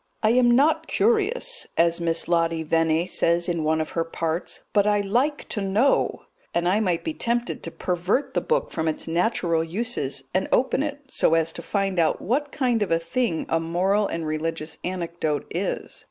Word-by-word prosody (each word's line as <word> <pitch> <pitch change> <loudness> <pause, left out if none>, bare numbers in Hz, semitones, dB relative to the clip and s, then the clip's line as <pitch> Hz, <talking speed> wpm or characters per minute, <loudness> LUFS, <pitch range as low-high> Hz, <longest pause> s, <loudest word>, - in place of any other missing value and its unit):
"I 215 - +4
am 245 0 +4
not 290 +5 +3
curious," 475 +3 +1
as 170 0 +3
Miss 165 -1 +1
Lottie 165 -1 +1
Venne 165 +1 +1
says 170 -1 +1
in 170 -3 -1
one 160 +1 +1
of 155 - -3
her 165 - 0
parts, 165 +1 -3
"but 205 -1 +3
I 205 -1 +3
like 250 +9 0
to 210 - -3
know," 210 +8 +1 0.3
and 170 0 +1
I 195 +4 +3
might 180 -6 0
be 320 - -2
tempted 240 -3 -2
to - - -6
pervert 180 +9 -1
the - - +1
book 485 +1 0
from 160 -1 -2
its 155 - -2
natural 170 -1 +1
uses 165 - -2
and 185 +1 +1
open 260 +1 +2
it, 290 -1 -3
so 165 - +3
as 165 0 +1
to - - -7
find 195 -3 -1
out 160 - +2
what 280 +6 -1
kind 245 -5 0
of 205 - 0
a 165 - +3
thing 165 +1 -1
a 165 - +1
moral 185 +5 +1
and 165 -1 -4
religious 155 0 -3
anecdote 170 -4 -2
is. - - -3
180 Hz, 190 wpm, -24 LUFS, 165-235 Hz, 0.3 s, I